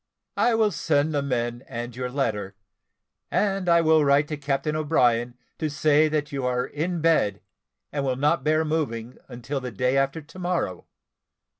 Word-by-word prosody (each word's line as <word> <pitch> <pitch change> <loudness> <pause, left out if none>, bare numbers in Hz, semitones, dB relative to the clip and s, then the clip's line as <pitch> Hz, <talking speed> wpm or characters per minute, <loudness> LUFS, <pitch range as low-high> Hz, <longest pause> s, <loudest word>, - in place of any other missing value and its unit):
I 240 -1 +3
will 220 -2 +3
send 155 -2 +1
the 145 - +1
men 120 -2 -2
and 120 -1 -6
your 125 0 -3
letter, 105 -7 -2 0.7
and 195 -3 0
I 170 0 +5
will 160 -1 +4
write 140 +1 +3
to 155 - -2
Captain 145 +2 -1
O'Brien 125 -6 +1 0.2
to 155 - -1
say 155 +1 +3
that 150 0 -2
you 135 -2 -3
are 125 0 0
in 170 +3 -3
bed, 130 -12 +2 0.5
and 140 -1 -2
will 130 -2 0
not 150 +5 +1
bear 155 +1 +2
moving 125 -7 -3
until 125 +3 -5
the 125 - -4
day 125 +4 0
after 135 +3 +1
to 185 - -13
morrow. 175 - -2
145 Hz, 170 wpm, -25 LUFS, 125-155 Hz, 0.7 s, I